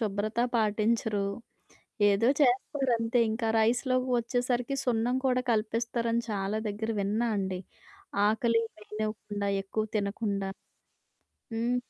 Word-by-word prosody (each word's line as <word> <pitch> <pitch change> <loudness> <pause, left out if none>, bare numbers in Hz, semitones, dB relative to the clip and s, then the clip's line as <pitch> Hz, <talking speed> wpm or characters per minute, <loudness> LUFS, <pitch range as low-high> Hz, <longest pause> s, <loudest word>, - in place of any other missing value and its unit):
శుభ్రత 215 +1 -2 0.2
పాటించరు? 215 -1 +1 0.8
ఏదో 205 +4 +3
చేస్తారంతే. 245 -3 +2
ఇంకా 225 0 -1
రైస్‌లోకి 255 +3 +2
వచ్చేసరికి 245 +2 0
సున్నం 245 0 +1
కూడా 255 -1 +3
కలిపిస్తారని 230 +1 0
చాలా 200 +1 -1
దెగ్గర 210 +2 -3
విన్నా 215 +4 0
అండి. 190 -2 -2 0.7
ఆకలి 230 +1 +2 0.2
వేయనివ్వకుండా 210 -1 -4 0.2
ఎక్కువ 215 +2 -2
తినకుండా. 200 -1 -1 1.1
హ్మ్. 235 +2 +1
225 Hz, 95 wpm, -29 LUFS, 210-240 Hz, 1.1 s, ఏదో